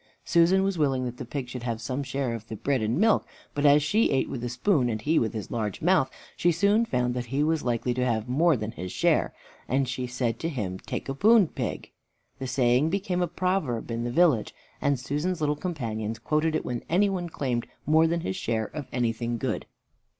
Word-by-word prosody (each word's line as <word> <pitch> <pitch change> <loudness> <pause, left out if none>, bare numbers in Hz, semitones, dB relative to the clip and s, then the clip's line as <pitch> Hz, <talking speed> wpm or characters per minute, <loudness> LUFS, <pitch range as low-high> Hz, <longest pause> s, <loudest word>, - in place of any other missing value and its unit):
Susan 175 +3 +4
was 195 -3 -1
willing 135 -4 +1
that 125 0 -5
the 125 - -6
pig 130 +1 -4
should 125 0 -6
have 115 -2 -3
some 130 +4 -3
share 135 -2 -2
of 115 -1 -7
the 110 - -6
bread 135 +2 0
and 110 +4 0
milk, 220 +3 +4 0.3
but 145 0 +2
as 145 +1 +6
she 210 +9 +2
ate 135 - +1
with 120 - -5
a 120 - -2
spoon 125 - +2
and 110 -1 -3
he 160 +5 +3
with 115 -1 -1
his 105 - -5
large 105 -4 -2
mouth, 175 -6 +3 0.3
she 175 - +3
soon 205 +7 +3
found 125 - 0
that 120 -1 -4
he 135 +5 0
was 160 0 +1
likely 120 0 0
to 125 +1 -1
have 115 -2 0
more 155 +4 +3
than 110 0 -4
his 90 -3 -6
share; - - +2 0.4
and 130 +1 +1
she 125 0 -3
said 125 -2 -2
to 165 - -2
him, 100 - -4
"Take - - -5
a 135 - -2
poon, 210 +6 +5
pig." 125 -7 -4 0.5
The 130 - -4
saying 125 +3 +3
became 185 -1 -1
a 175 - +2
proverb 170 -10 -1
in 115 0 -2
the 120 - -2
village, 135 -4 +2 0.3
and 140 -2 +1
Susan's 150 +7 -2
little 150 -1 +1
companions 115 - -3
quoted 155 +5 0
it - - -1
when 120 -1 -3
any 190 +5 +4
one 180 -3 -2
claimed 125 -6 -2 0.2
more 160 +2 +5
than 170 +1 0
his 95 - -3
share 110 -1 -1
of 145 -4 -5
anything 120 -1 -1
good. - - -3
135 Hz, 225 wpm, -27 LUFS, 120-165 Hz, 0.5 s, as